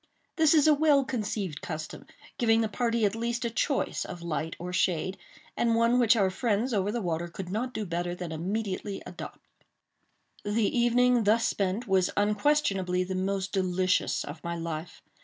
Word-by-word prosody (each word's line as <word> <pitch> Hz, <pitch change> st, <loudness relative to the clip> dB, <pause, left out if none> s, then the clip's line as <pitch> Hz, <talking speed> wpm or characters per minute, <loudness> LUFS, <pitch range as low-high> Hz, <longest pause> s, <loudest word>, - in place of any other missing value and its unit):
This 320 Hz, -1 st, +4 dB
is 300 Hz, -, +5 dB
a 310 Hz, -, +7 dB
well 290 Hz, -2 st, +4 dB
conceived 210 Hz, -, -3 dB
custom, 155 Hz, -2 st, -6 dB, 0.3 s
giving 225 Hz, -1 st, +4 dB
the 220 Hz, -, +1 dB
party 230 Hz, 0 st, 0 dB
at 200 Hz, -, +1 dB
least 235 Hz, +1 st, -2 dB
a 235 Hz, -, -1 dB
choice 270 Hz, +4 st, 0 dB
of 175 Hz, -1 st, -8 dB
light 160 Hz, -1 st, -3 dB
or 180 Hz, +1 st, -6 dB
shade, 185 Hz, +1 st, 0 dB, 0.4 s
and 230 Hz, -1 st, +2 dB
one 230 Hz, +2 st, +3 dB
which 235 Hz, -1 st, +5 dB
our 195 Hz, -4 st, +2 dB
friends 230 Hz, +4 st, 0 dB
over 200 Hz, -1 st, +1 dB
the 235 Hz, -1 st, -3 dB
water 170 Hz, -1 st, -2 dB
could 180 Hz, +1 st, -7 dB
not 240 Hz, +5 st, -2 dB
do 220 Hz, -4 st, -4 dB
better 175 Hz, 0 st, -2 dB
than 175 Hz, -2 st, -6 dB
immediately 195 Hz, +4 st, -3 dB
adopt. -, -, -8 dB, 1.0 s
The 210 Hz, +1 st, 0 dB
evening 240 Hz, 0 st, +3 dB
thus 220 Hz, +2 st, +3 dB
spent 200 Hz, +5 st, -1 dB
was 190 Hz, -2 st, +3 dB
unquestionably 205 Hz, -4 st, +1 dB
the 185 Hz, +1 st, -4 dB
most 190 Hz, +1 st, -1 dB
delicious 185 Hz, -1 st, +1 dB
of 145 Hz, +3 st, -9 dB
my 170 Hz, 0 st, -3 dB
life. 165 Hz, 0 st, -6 dB
205 Hz, 175 wpm, -28 LUFS, 180-235 Hz, 1.0 s, a